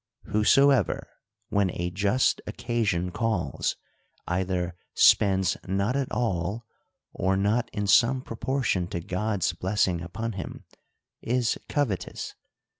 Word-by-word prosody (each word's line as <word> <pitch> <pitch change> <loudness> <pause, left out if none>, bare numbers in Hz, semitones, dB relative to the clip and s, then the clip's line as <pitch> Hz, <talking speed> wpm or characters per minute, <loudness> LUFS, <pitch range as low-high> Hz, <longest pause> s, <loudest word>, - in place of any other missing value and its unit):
Whoso 135 +7 +4
ever, 135 - +1 0.4
when 100 -2 +2
a 90 0 -1
just 100 +7 +1
occasion 100 -7 -1
calls, 100 - -1 0.5
either 90 -1 -1 0.2
spends 95 -2 +4
not 100 +6 0
at 140 -2 -1
all, 105 0 -1 0.5
or 95 +1 +1
not 105 +5 +1
in 105 - -2
some 120 +6 +4
proportion 115 -7 -1
to 85 - -4
God's 95 +1 -1
blessing 90 -1 0
upon 105 +7 -4
him, 95 -3 -7 0.6
is 120 0 0
covetous. 130 -11 -2
100 Hz, 115 wpm, -27 LUFS, 90-115 Hz, 0.6 s, Whoso